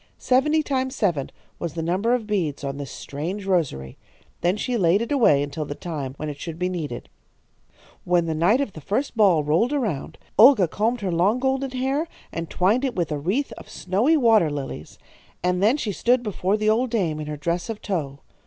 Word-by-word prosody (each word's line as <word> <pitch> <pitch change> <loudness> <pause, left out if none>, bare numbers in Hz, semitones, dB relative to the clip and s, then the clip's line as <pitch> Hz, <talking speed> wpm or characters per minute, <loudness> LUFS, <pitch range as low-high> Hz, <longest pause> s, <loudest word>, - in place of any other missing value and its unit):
Seventy 300 +5 +2
times 260 -2 -1
seven 170 - 0 0.3
was 170 -3 -4
the 165 - -2
number 195 +9 +1
of 235 -3 -4
beads 175 -10 -2
on 140 0 -3
this 140 -2 -6
strange 175 +8 -5
rosary. 150 - -1 0.4
Then 180 +4 +1
she 250 +3 -2
laid 185 -3 +3
it 235 - -7
away 215 - +4
until 145 +2 -4
the 145 -1 -6
time 145 -7 -5
when 155 - -4
it 145 -1 -6
should 165 0 -6
be 180 +1 -1
needed. 155 -9 -5 1.0
"When 175 -1 +2
the 160 - -1
night 180 - +3
of 230 -9 -3
the 155 - -9
first 245 - -2
ball 190 -8 +4
rolled 165 - +2
around, 215 - -2 0.2
Olga 225 -5 +8
combed 225 +7 -1
her 190 -2 -1
long 185 +7 +2
golden 265 +1 0
hair 265 +5 -1 0.2
and 165 -1 -5
twined 210 +8 +2
it 260 -3 -1
with 170 -3 -1
a 150 - -1
wreath 200 - -1
of - - -13
snowy 220 - +1
water 225 - +4
lilies, 135 - -6 0.5
and 180 0 +1
then 225 +8 +4
she 220 -8 -2
stood 245 +5 +2
before 205 -1 0
the 215 0 -1
old 235 +4 +2
dame 180 -10 -1
in 150 - -5
her 150 0 -4
dress 170 +7 -2
of 220 -2 -4
tow. 145 -8 -4
185 Hz, 205 wpm, -23 LUFS, 155-240 Hz, 1.0 s, Olga